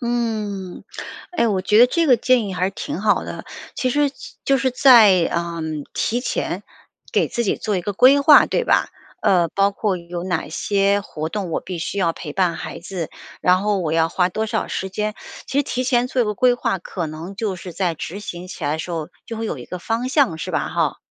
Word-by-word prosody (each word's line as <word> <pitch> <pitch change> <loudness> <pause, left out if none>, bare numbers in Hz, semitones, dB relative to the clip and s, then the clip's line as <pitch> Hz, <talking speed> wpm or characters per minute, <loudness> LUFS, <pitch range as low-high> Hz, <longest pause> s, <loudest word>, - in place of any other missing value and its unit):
嗯。 215 -6 -3 0.5
哎， 320 -9 +1
我 195 -3 +1
觉 210 +3 +3
得 245 - +9
这 330 +6 +1
个 255 -4 +6
建 245 -1 +2
议 190 - -4
还 180 +1 0
是 - - -2
挺 190 - -5
好 210 0 +2
的。 - - -7 0.3
其 255 - 0
实 290 +2 +2 0.3
就 275 0 +3
是 260 0 +1
在， 225 -9 +6
呃， 170 -1 -2 0.3
提 240 +2 0
前 - - -2 0.5
给 - - +2
自 235 - -2
己 200 - +1
做 210 -3 -2
一 - - 0
个 205 - -2
规 260 +8 +6
划， 290 +1 +8
对 - - 0
吧？ - - +3 0.3
呃， 175 -3 +3
包 200 +4 +2
括 195 -1 -1
有 170 0 -6
哪 175 -5 -2
些 200 +4 +1
活 160 -5 -5
动， 195 -2 -4
我 - - -1
必 185 - -6
须 190 +4 -3
要 170 -4 +2
陪 150 -2 -7
伴 180 0 +1
孩 - - -6
子， 175 -2 -5 0.3
然 180 0 +4
后 205 -1 +1
我 160 -3 -1
要 165 0 +3
花 180 +1 +1
多 220 +5 -2
少 - - -2
时 190 - -3
间。 210 +2 -2 0.3
其 275 - -1
实 - - +4
提 255 -1 -2
前 245 -1 +2
做 255 -1 +1
一 - - 0
个 210 -1 -2
规 250 +3 +4
划， 235 -5 -1
可 175 -1 -5
能 160 +5 -7
就 205 -2 -2
是 180 0 -8
在 175 -1 -1
执 175 +5 -6
行 175 -3 -7
起 185 - -9
来 145 - +1
的 - - -4
时 170 - -5
候 160 -2 -3 0.2
就 230 - -6
会 225 - -3
有 155 - -4
一 120 - -8
个 180 - -6
方 230 +5 -2
向， 260 - +2
是 - - -4
吧？ - - 0
哈。 - - 0
200 Hz, 250 characters per minute, -21 LUFS, 175-240 Hz, 0.5 s, 得